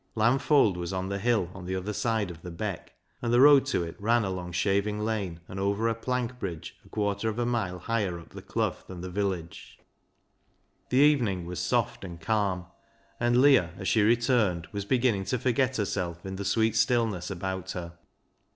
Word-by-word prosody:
Lamb 115 +5 +3
Fold 135 - +3
was 85 -1 -4
on 95 0 -3
the 100 0 -2
hill 105 -5 +1
on 95 -2 -9
the 95 - -2
other 95 +3 -3
side 110 -4 0
of 80 -1 -12
the 90 - -7
Beck, 95 +2 -5 0.3
and 120 - -1
the 120 - +4
road 140 0 +7
to 125 -10 0
it 85 -1 -6
ran 115 +3 +2
along 90 -2 -4
Shaving 100 +4 0
Lane, 100 -6 -2
and 95 - -7
over 100 +3 +1
a 115 - +2
plank 125 +1 -3
bridge 85 -7 -5
a - - -19
quarter 105 +1 -1
of 110 - -4
a 120 - 0
mile 110 -7 -1
higher 100 -3 -2
up 85 - -14
the - - -10
Clough - - -1
than 90 -2 -8
the 90 0 -6
village. 95 -4 -4 1.1
The 125 - +1
evening 125 - +3
was 90 +1 -5
soft - - 0
and 85 -3 -8
calm, 95 0 0 0.5
and 120 +1 +3
Leah, 125 - +5
as 95 - -5
she 110 - +3
returned, 110 -6 +2
was 100 -1 -4
beginning 120 -4 +1
to 125 - 0
forget 130 +2 +1
herself 90 -4 -2
in 95 0 -5
the 100 - -4
sweet 110 +2 +2
stillness 115 -5 +1
about 95 0 -4
her. 85 -2 -6
100 Hz, 195 wpm, -28 LUFS, 90-115 Hz, 1.1 s, road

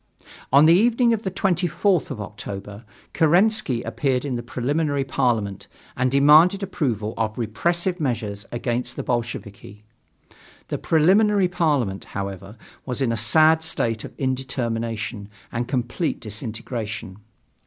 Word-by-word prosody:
On 140 +3 +7
the 165 - +7
evening 235 +5 +4
of 220 - -1
the 195 - -2
24th 180 -1 +1
of 135 -6 -6
October, 105 +1 -8 0.3
Kerensky 175 - +3
appeared 130 -2 -1
in 140 - -2
the 120 - -3
Preliminary 140 +4 -1
Parliament 115 -7 -1 0.3
and 130 0 +1
demanded 155 +8 +5
approval 120 - -2
of 110 -1 -2
repressive 170 - -1
measures 110 -8 -2
against 120 0 -2
the - - -4
Bolsheviki. 105 -4 -5 0.9
The - - -3
Preliminary 195 +5 +3
Parliament, 145 - 0
however, 100 +2 -6 0.3
was 125 0 -4
in 120 - +1
a - - 0
sad 160 +7 +4
state 115 -8 -1
of - - -10
indetermination 115 -5 -3 0.2
and 120 0 -3
complete 125 +5 -2
disintegration. 110 -2 -5
125 Hz, 125 wpm, -23 LUFS, 110-160 Hz, 0.9 s, On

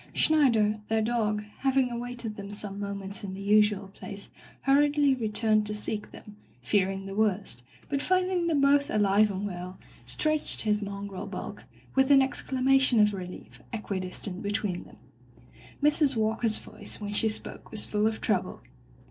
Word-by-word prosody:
Schneider, 230 -9 +3
their 220 0 +1
dog, 215 -2 0 0.2
having 265 -2 +2
awaited 240 -2 -5
them 200 0 -8
some 205 -1 -4
moments 200 -1 -5
in 190 -1 -5
the - - -8
usual 205 -1 +3
place 200 0 -9 0.3
hurriedly 290 0 +3
returned 220 -2 +1
to 210 - -3
seek 210 0 -3
them, 210 0 -13 0.2
fear 185 +10 +1
ing 195 0 -5
the 195 - -6
worst, 200 - 0 0.3
but 280 - -1
finding 365 -1 +1
them 305 -4 +2
both 280 0 +4
alive 210 0 +3
and 200 0 -3
well, 180 -1 -6 0.3
stretched 310 -1 +1
his 210 -1 +1
mongrel 200 -1 -6
bulk, - - -7 0.3
with 265 0 +3
an 280 -1 +7
exclamation 265 -1 +2
of 210 0 +4
relief, 180 -2 -9
equidistant 190 -3 -4
between 205 -3 -2
them. - - -16 0.9
Mrs. 295 -2 +4
Walker's 220 0 +1
voice - - -8
when 205 -1 -5
she 220 +1 +2
spoke 215 - -5
was 215 - +4
full 210 0 +1
of 220 0 -2
trouble. - - -1
215 Hz, 155 wpm, -28 LUFS, 200-260 Hz, 0.9 s, an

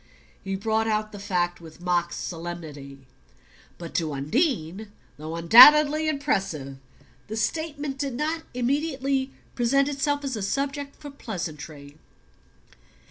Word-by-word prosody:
He 195 0 -3
brought 220 +3 0
out 215 -1 -1
the 205 - -9
fact 175 -3 -1
with 160 0 -13
mock 175 -1 0
solemnity. 155 -7 -7 0.7
But 170 -1 -8
to 160 -3 -1
Undine, 205 - -1 0.3
though 155 +2 -6
undoubtedly 295 - +8
impressive, 195 - -2 0.5
the 220 - -5
statement 290 +2 -2
did 275 -3 -2
not 315 +4 -1
immediately 270 +1 0 0.2
present 275 +3 +2
itself 285 0 -1
as 270 -3 -2
a 215 - -4
subject 280 +7 -2
for 290 -1 -10
pleasantry. 155 - -7
220 Hz, 120 wpm, -25 LUFS, 170-280 Hz, 0.7 s, undoubtedly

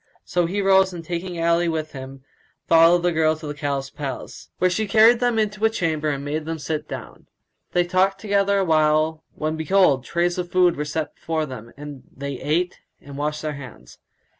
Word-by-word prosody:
So 175 -1 0
he 200 +3 -1
rose 190 -1 +4
and, 170 -2 -8
taking 175 +1 -4
Ali 170 +1 +2
with 155 -1 -3
him, 135 0 -9 0.4
followed 170 +1 +6
the 175 - +2
girl 160 -1 +2
to 155 0 -10
the 145 - -4
Caliph's 140 -1 -3
palace, 140 -3 -7
where 185 - +3
she 210 +4 -1
carried 225 +4 +6
them 245 -2 +1
into 210 0 -1
a 220 - +5
chamber 160 -8 -1
and 140 -1 -3
made 150 +2 -3
them 165 0 -3
sit 155 0 -4
down. - - -9 0.5
They 175 - +3
talked 185 +2 +1
together 200 -1 +1
awhile, 155 -3 +2
when 155 +1 -2
behold, 160 -5 +3
trays 175 +4 0
of 175 -1 -4
food 180 -2 +4
were 150 - -3
set 155 +1 -3
before 160 -1 -2
them, 120 -4 -9
and 145 -2 -9 0.2
they 140 -1 -5
ate 175 +4 -1 0.2
and 140 -1 -11
washed 150 +2 -3
their 155 -1 -2
hands. 130 - -12
160 Hz, 195 wpm, -23 LUFS, 150-180 Hz, 0.5 s, followed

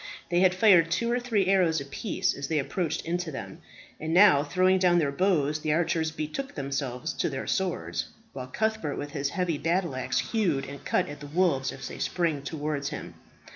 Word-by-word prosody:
They 175 - +3
had 185 0 +4
fired 185 -5 +6
two 235 +7 0
or 245 - +1
three 225 -6 +1
arrows 180 -4 +3
apiece, 140 +9 -2
as 140 0 -5
they 160 - 0
approached, 160 +3 -1
into 175 0 -2
them; 130 - -7 0.4
and 160 +2 -2
now, 185 -7 +7
throwing 185 +5 +3
down 180 -1 +4
their 150 -5 +2
bows, 155 -3 +1
the 155 -1 0
archers 165 -1 +1
betook 160 - -5
themselves 135 +1 -3
to - - -1
their 135 -2 -4
swords, 190 -3 -1 0.3
while 130 -2 -6
Cuthbert 220 -1 -1
with 145 - -5
his 140 -2 -2
heavy 180 -4 -1
battle 170 -3 0
axe 130 -1 -2
hewed 145 - 0
and 140 0 -9
cut - - +1
at 145 0 -8
the 145 - -8
wolves 150 -4 +1
as - - -7
they - - -8
sprang 165 -5 0
towards 145 -1 -3
him. - - -7
160 Hz, 195 wpm, -27 LUFS, 140-185 Hz, 0.4 s, now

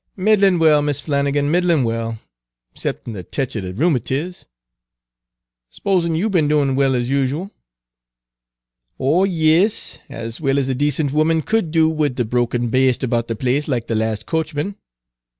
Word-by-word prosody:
Page 210 +2 +3
238 200 0 +5
"Middlin' 180 -2 0
well, 150 -2 +5
Mis' 145 -1 -1
Flannigan, 145 0 0
middlin' 170 -4 +2
well, 115 -1 -2 0.5
'ceptin' 115 - -5
a 95 - -5
tech 130 +7 -4
er 110 - -2
de 90 -1 -5
rheumatiz. 145 - -1 1.2
S'pose 185 - 0
you 165 +5 0
be'n 175 -8 +2
doin' 145 -3 +2
well 135 -1 +2
as 120 +1 -1
usual?" 140 +8 -1 1.5
"Oh 155 +9 +3
yis, 170 +3 +1
as 115 +2 -7
well 135 -2 +1
as 135 -2 0
a 135 - 0
decent 145 +1 0
woman 155 +1 +2
could 220 -6 0
do 160 0 +3
wid 150 -5 -1
a - - +3
drunken 120 +1 -1
baste 130 +1 +2
about 120 -2 0
the 115 - -3
place 130 +5 -1
like 125 -5 -1
the - - -3
lahst 110 -1 -1
coachman. 160 +3 -2
145 Hz, 165 wpm, -19 LUFS, 125-160 Hz, 1.5 s, 238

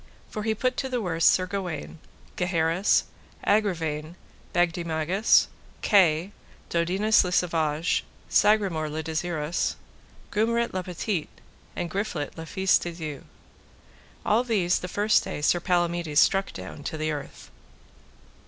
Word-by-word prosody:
For 215 - -4
he 220 +1 0
put 255 +3 -1
to 265 - -2
the 250 -1 -1
worse 165 -6 0
Sir 185 - +5
Gawaine, 180 -5 -5 0.4
Gaheris, 175 +1 +2 0.4
Agravaine, 165 -6 0 0.4
Bagdemagus, 175 +2 +2 0.4
Kay, 180 -3 +4 0.4
Dodinas 190 +6 +3
le 180 - -3
Savage, 165 -2 +1 0.2
Sagramore 195 -8 +2
le 155 +1 -4
Desirous, 160 0 -2 0.6
Gumret 235 +2 +1
le 185 - -1
Petit, 180 0 -3 0.5
and 170 - -3
Griflet 195 -6 -3
le 160 0 -8
Fise 190 +1 +3
de 175 - -5
Dieu. 155 -4 -6 1.0
All 220 +4 +3
these 200 -8 +1
the 180 - -5
first 205 +3 +2
day - - -5
Sir 155 +4 +2
Palamides 175 -3 +1
struck 195 0 +3
down 95 +10 -9
to 160 - -4
the 155 0 -1
earth. 145 -2 -7
175 Hz, 125 wpm, -26 LUFS, 160-200 Hz, 1.0 s, Sir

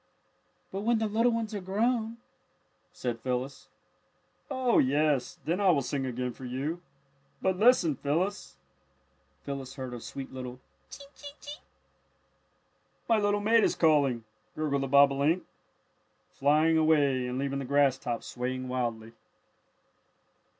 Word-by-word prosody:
"But 195 - -4
when 235 +2 +2
the 220 - 0
little 225 +3 +2
ones 230 -1 -2
are 205 - -3
grown 225 +4 0 0.4
" - - -42 0.3
said 120 -2 -4
Phyllis. 130 +3 -4 0.8
"Oh, 260 -3 +2
yes, 145 0 +1
then 175 +5 0
I 195 - +4
will 145 -6 +3
sing 135 0 -2
again 125 0 -3
for 130 - -13
you. 135 +7 -3 0.6
But 190 -1 0
listen, 205 - +4
Phyllis!" 175 +8 -2 0.9
Phyllis 135 -2 -6
heard 130 -2 -6
a 120 - -6
sweet 135 +1 -8
little 125 -1 -7 0.3
"Chink! 280 0 -12
Chink! 290 0 -12
Chink!" 295 +1 -9 1.5
"My 225 -2 +3
little 205 0 +1
mate 225 +1 +4
is - - +2
calling," 140 -7 +3 0.3
gurgled 145 -3 -1
the 135 - -2
bobolink, 140 +5 +4 0.9
flying 155 +3 +3
away 145 -5 +3
and 125 +1 -3
leaving 140 0 -2
the 135 - -4
grass 140 -1 +3
top 120 -3 -4
swaying 130 +1 -4
wildly. 115 -3 -3
145 Hz, 135 wpm, -29 LUFS, 130-205 Hz, 1.5 s, I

